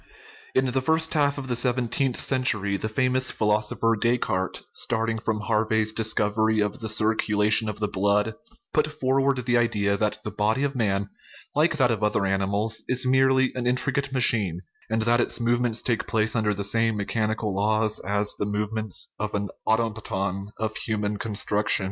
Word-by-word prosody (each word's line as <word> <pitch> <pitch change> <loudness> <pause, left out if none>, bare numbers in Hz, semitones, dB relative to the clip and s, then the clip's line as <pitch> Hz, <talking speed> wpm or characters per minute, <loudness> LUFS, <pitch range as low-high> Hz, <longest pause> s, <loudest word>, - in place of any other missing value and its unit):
In 130 - +3
the 130 +1 0
first 160 +3 +1
half 145 -2 +2
of 135 -2 -5
the 125 - 0
seventeenth 125 +1 0
century 110 -7 +1
the 110 +2 -3
famous 130 +3 +1
philosopher 110 +2 +1
Descartes, 110 -5 0
starting 115 -1 -1
from 110 -1 -2
Harvey's 110 0 +1
discov 110 -1 0
ery 110 0 +3
of 105 -1 -1
the 110 - -4
circulation 110 0 +2
of 105 - -6
the 105 - 0
blood, 100 +2 +1 0.4
put 150 -1 +2
forward 135 -3 0
the 120 -1 +3
idea 100 -4 +1
that 105 0 0
the 110 - -4
body 110 +6 0
of 140 -1 -1
man, 100 -4 0 0.4
like 155 +1 +2
that 130 -4 +3
of 110 -2 -2
other 105 -2 +1
animals, 100 +3 0
is 130 +1 +1
merely 130 0 +3
an 125 -1 -3
intricate 140 +2 +1
machine, 110 -9 +1 0.3
and 110 0 0
that 120 +1 +3
its - - -1
movements 120 -1 0
take 115 -3 -1
place 110 +1 0
under 110 -2 +1
the 100 0 -3
same 115 +2 +1
mechanical 110 0 -1
laws 110 +1 +1
as 105 +1 -1
the - - 0
movements 105 -1 -2
of 105 0 -3
an 100 0 -2 0.2
automaton 105 -4 -1
of 110 -1 -3
human 105 -2 -2
construction. 105 0 0
110 Hz, 170 wpm, -25 LUFS, 105-125 Hz, 0.4 s, In